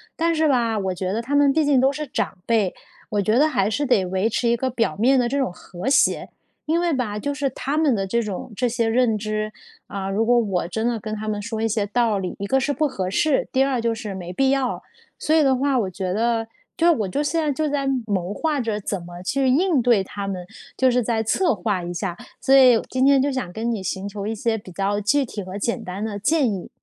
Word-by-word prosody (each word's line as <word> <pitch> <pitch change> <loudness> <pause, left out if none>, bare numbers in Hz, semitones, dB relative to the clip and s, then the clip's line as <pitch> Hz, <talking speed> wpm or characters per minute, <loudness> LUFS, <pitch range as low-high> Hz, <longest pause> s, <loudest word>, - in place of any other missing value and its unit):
但 335 0 +1
是 315 -1 +2
吧， 230 -5 +1
我 190 -1 -1
觉 185 +1 -3
得 225 +3 -1
他 280 +5 -2
们 285 -1 +5
毕 310 +1 +2
竟 275 -3 +4
都 270 +1 +4
是 300 0 -5
长 250 - -3
辈， 215 -5 +1 0.4
我 205 -1 0
觉 215 +4 +2
得 300 - +5
还 195 -7 +1
是 290 +7 -1
得 225 -8 +3
维 190 +4 0
持 235 +2 0
一 235 - +3
个 260 +2 -1
表 230 -2 -1
面 255 +6 +3
的 240 - +2
这 280 +3 -1
种 260 -10 0
和 180 +6 -6
谐。 - - +2 0.4
因 325 +3 +1
为 345 -2 +1
吧， 220 -6 -2
就 285 +4 -2
是 275 0 -1
他 275 +4 -3
们 305 -5 +3
的 195 -1 -1
这 235 +4 +1
种 210 +1 -5
这 245 +1 0
些 230 -1 0
认 225 -1 +2
知， 215 0 -3 0.4
啊， 195 -1 -4
如 215 +3 +1
果 240 +1 +4
我 190 -6 -1
真 220 +5 -2
的 235 -1 0
跟 215 +1 -5
他 215 +1 -6
们 210 -1 -2
说 220 +1 -4
一 225 - +2
些 210 -2 0
道 220 -2 +1
理， 185 -1 -4
一 200 - -3
个 265 +6 +2
是 285 - 0
不 305 +1 +1
合 185 -8 -3
适， 285 +8 +1
第 265 0 +3
二 260 -4 0
就 230 -1 +1
是 215 -3 -6
没 180 -2 -6
必 270 +8 +2
要。 270 -2 0 0.4
所 315 - +1
以 315 - +5
的 265 -1 +3
话 275 0 +1
我 195 -4 -1
觉 185 0 -4
得， 225 +1 +1 0.3
就 340 +1 +4
我 215 - 0
就 285 +10 -1
现 320 +3 0
在 300 -2 0
就 305 +1 -1
在 280 -1 -1 0.2
谋 195 -2 -2
划 305 0 -1
着 220 -3 -2
怎 195 -2 -3
么 175 +1 -10
去 270 +7 0
应 305 +1 +3
对 235 -5 +3
他 200 +1 -6
们， 180 -2 -4 0.3
就 260 -1 +3
是 250 0 +2
再 225 -1 0
策 330 - +2
划 190 -1 -1
一 175 +1 -5
下， 175 0 -3 0.2
所 270 - +3
以 255 -4 +7
今 260 +1 +1
天 275 -1 +5
就 285 +1 +1
想 250 -9 -3
跟 230 +3 -2
你 215 -4 -2
寻 190 +1 -4
求 200 0 -5
一 225 - -2
些 225 +1 0
比 200 - -11
较 200 +2 0
具 275 +8 +2
体 220 -4 -6
和 185 +1 -7
简 235 +3 -2
单 185 +3 -5
的 210 -2 -4
建 275 +1 +2
议。 190 - -6
230 Hz, 280 characters per minute, -22 LUFS, 200-270 Hz, 0.4 s, 以